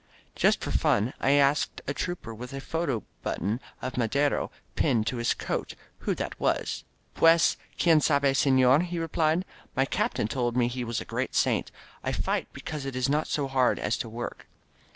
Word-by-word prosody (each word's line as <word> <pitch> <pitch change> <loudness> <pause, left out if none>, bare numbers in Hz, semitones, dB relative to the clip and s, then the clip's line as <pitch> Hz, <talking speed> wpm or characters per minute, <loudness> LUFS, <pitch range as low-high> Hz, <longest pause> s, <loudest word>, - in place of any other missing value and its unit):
Just - - +3
for - - -3
fun 110 +6 +2
I 135 - +3
asked 145 0 +3
a 140 - -2
trooper 175 -8 -4
with 125 +4 -8
a 135 - -4
photo 140 -5 -2 0.2
button 105 +7 -2 0.2
of 130 -1 -4
Madero 140 +5 +1 0.3
pinned 110 -2 +2
to 115 +2 -2
his 120 0 +1
coat - - -3 0.2
who - - -1
that - - -5
was. - - 0 0.3
"PtieSy 165 +1 +5 0.2
quien 165 -3 +5
sabe^ 140 -2 +3
sefiorf* 130 +1 +5
he 175 0 -4
replied. 165 +1 +1 0.3
"My 135 - +3
captain 110 - 0
told 120 0 -1
me 120 -1 +3
he 125 0 -3
was 115 -1 -2
a - - -7
great - - -3
saint. - - +2 0.3
I - - -1
fight - - -1
because 150 -3 -6
it 135 -1 -5
is 130 +1 0
not 150 +2 +1
so 145 -2 -1
hard 130 -2 +2
as 105 - 0
to 115 - -4
work." 120 +2 -6
135 Hz, 185 wpm, -28 LUFS, 120-150 Hz, 0.3 s, PtieSy